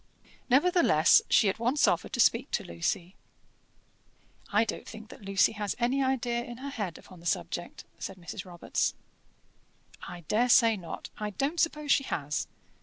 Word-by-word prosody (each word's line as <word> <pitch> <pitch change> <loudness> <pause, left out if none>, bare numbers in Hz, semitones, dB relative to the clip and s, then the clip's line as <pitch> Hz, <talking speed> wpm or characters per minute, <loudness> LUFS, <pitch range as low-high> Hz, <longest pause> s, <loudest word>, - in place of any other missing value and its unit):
Nevertheless, 345 - +5
she 215 - +5
at 195 +3 -1
once 245 +5 +2
offered - - 0
to 245 - -3
speak 240 +3 +3
to - - 0
Lucy. 125 - -3 1.4
"I 215 +2 +3
don't 225 - -5
think 220 0 -10
that - - -12
Lucy 195 0 +2
has 210 -2 -3
any 250 +3 +1
idea 245 -2 0
in 240 0 -9
her 280 +2 -6
head 200 -10 -4
upon 185 - -15
the 170 - -7
subject," 175 +1 -3 0.2
said 195 - -6
Mrs. 180 +2 -7
Robarts. 175 -2 -2 1.1
"I 175 - -8
dare 220 +9 +1
say 230 -2 +6
not 175 -5 -8
I 210 -1 -2
don't 275 - -2
suppose 300 -3 0
she 275 - +4
has. 150 - -2
225 Hz, 165 wpm, -29 LUFS, 185-260 Hz, 1.4 s, say